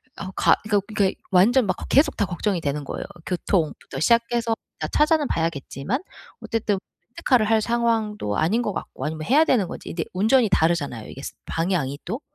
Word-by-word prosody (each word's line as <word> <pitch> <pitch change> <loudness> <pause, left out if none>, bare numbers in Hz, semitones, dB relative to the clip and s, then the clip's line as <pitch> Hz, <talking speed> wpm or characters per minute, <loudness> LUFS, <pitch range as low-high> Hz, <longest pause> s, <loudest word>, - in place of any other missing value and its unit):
아우 190 -1 -6
가 - - +5
이거 205 -2 +2
이게 205 -3 +1 0.2
완전 225 +7 +5
막 185 - +1
걱 - - -8
계속 295 +2 +4
다 205 - +1
걱정이 185 0 -1
되는 145 0 -2
거예요. - - -5 0.2
교통부터 170 -6 -2
시작해서 235 +3 +2 0.2
다 - - -2
찾아는 305 -1 +2
봐야겠지만 165 - -2 0.4
어쨌든 220 -3 -1 0.3
렌트카를 240 -3 +2
할 220 -1 +4
상황도 220 - 0
아닌 195 +10 +2
것 210 - -1
같고 - - -6
아니면 155 0 -4
해야 295 +5 +5
되는 230 - +2
건지. - - -8
근데 165 -1 -2
운전이 220 +6 +4
다르잖아요 160 - 0
이게 135 - -9
스 - - -6
방향이 165 -5 -1
또. 230 - -4
205 Hz, 395 characters per minute, -23 LUFS, 165-235 Hz, 0.4 s, 가